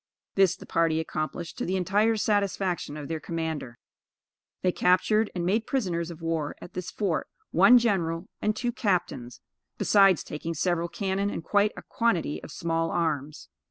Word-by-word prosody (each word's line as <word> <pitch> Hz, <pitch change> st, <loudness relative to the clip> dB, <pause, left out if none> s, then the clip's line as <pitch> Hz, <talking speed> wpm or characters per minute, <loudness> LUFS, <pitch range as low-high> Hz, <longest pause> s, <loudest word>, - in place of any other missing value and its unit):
This 195 Hz, -3 st, +4 dB
the -, -, -12 dB
party 165 Hz, -1 st, +1 dB
accomplished 160 Hz, +1 st, -4 dB
to -, -, -1 dB
the 185 Hz, -, 0 dB
entire 205 Hz, +5 st, +2 dB
satisfaction 195 Hz, -7 st, 0 dB
of 145 Hz, -2 st, -6 dB
their 160 Hz, -1 st, -3 dB
commander. 160 Hz, -7 st, -4 dB, 0.9 s
They 180 Hz, -, +3 dB
captured 210 Hz, +5 st, +3 dB
and 175 Hz, -1 st, -1 dB
made 215 Hz, +5 st, +1 dB
prisoners 175 Hz, -10 st, -1 dB
of 165 Hz, -1 st, -10 dB
war 165 Hz, -3 st, -1 dB
at -, -, -11 dB
this 180 Hz, 0 st, -4 dB
fort, 195 Hz, -7 st, -1 dB, 0.2 s
one 245 Hz, -, +7 dB
general 185 Hz, -6 st, 0 dB
and 215 Hz, 0 st, +1 dB
two 240 Hz, +2 st, -1 dB
captains, 180 Hz, -, -2 dB, 0.4 s
besides 195 Hz, -4 st, +5 dB
taking 165 Hz, +2 st, -5 dB
several 170 Hz, +1 st, 0 dB
cannon 195 Hz, +2 st, -1 dB
and 170 Hz, -, -5 dB
quite 205 Hz, +4 st, +2 dB
a -, -, -8 dB
quantity 195 Hz, -10 st, 0 dB
of -, -, -10 dB
small 165 Hz, 0 st, -1 dB
arms. 150 Hz, -3 st, -2 dB
175 Hz, 160 wpm, -27 LUFS, 165-200 Hz, 0.9 s, one